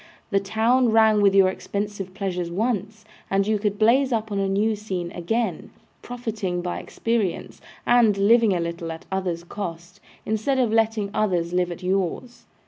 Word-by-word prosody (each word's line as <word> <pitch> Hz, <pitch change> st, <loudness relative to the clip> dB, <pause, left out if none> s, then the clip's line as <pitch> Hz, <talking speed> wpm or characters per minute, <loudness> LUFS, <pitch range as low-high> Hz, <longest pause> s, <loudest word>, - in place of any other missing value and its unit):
The 200 Hz, -, +3 dB
town 230 Hz, +5 st, +2 dB
rang 220 Hz, -1 st, +4 dB
with 200 Hz, -1 st, +4 dB
your 195 Hz, -1 st, +6 dB
expensive 200 Hz, -1 st, -5 dB
pleasures 180 Hz, -3 st, -3 dB
once, 215 Hz, +2 st, -2 dB, 0.2 s
and 195 Hz, 0 st, +2 dB
you 215 Hz, 0 st, +1 dB
could 205 Hz, -1 st, -1 dB
blaze 255 Hz, +5 st, +3 dB
up 220 Hz, -2 st, -1 dB
on 200 Hz, -, -1 dB
a 195 Hz, 0 st, 0 dB
new 210 Hz, +3 st, +1 dB
scene 185 Hz, -5 st, -4 dB
again, 225 Hz, +8 st, -2 dB, 0.3 s
profiting 215 Hz, -7 st, -4 dB
by 180 Hz, -, -3 dB
experience, 230 Hz, -6 st, -2 dB, 0.2 s
and 235 Hz, -4 st, +4 dB
living 220 Hz, +2 st, +4 dB
a 180 Hz, -, 0 dB
little 170 Hz, 0 st, -4 dB
at 160 Hz, -, -9 dB
others' 180 Hz, -3 st, -2 dB
cost, 170 Hz, -2 st, -7 dB, 0.3 s
instead 220 Hz, +5 st, 0 dB
of 240 Hz, -4 st, +1 dB
letting 220 Hz, -2 st, +1 dB
others 180 Hz, -6 st, 0 dB
live 180 Hz, -1 st, +1 dB
at 175 Hz, +2 st, -8 dB
yours. 190 Hz, +6 st, -2 dB
200 Hz, 165 wpm, -24 LUFS, 180-225 Hz, 0.3 s, your